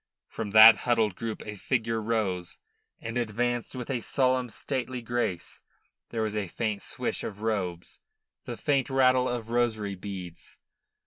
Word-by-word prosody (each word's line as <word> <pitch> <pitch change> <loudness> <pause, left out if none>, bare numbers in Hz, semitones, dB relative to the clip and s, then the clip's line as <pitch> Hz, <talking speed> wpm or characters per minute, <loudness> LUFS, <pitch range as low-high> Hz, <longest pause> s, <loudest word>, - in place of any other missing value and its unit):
From 110 -2 -5
that 110 +2 +10
huddled 115 -4 +1
group 115 +1 -5
a 105 - -6
figure 115 +1 -1
rose, 105 -6 -2 0.4
and 115 +2 -3
advanced 120 +2 -1
with 125 +1 -4
a 125 -3 -1
solemn, 130 0 +1
stately 125 0 -4
grace. 115 -7 -3 0.5
There 115 -2 -2
was 110 -1 -2
a 105 -3 -1
faint 105 +2 -2
swish - - -3
of 100 -1 -6
robes, 90 -6 -3 0.5
the - - -5
faint 140 -3 +1
rattle 130 -1 +4
of 115 -2 -4
rosary 110 -4 0
beads. 95 -3 -8
115 Hz, 145 wpm, -28 LUFS, 105-120 Hz, 0.5 s, that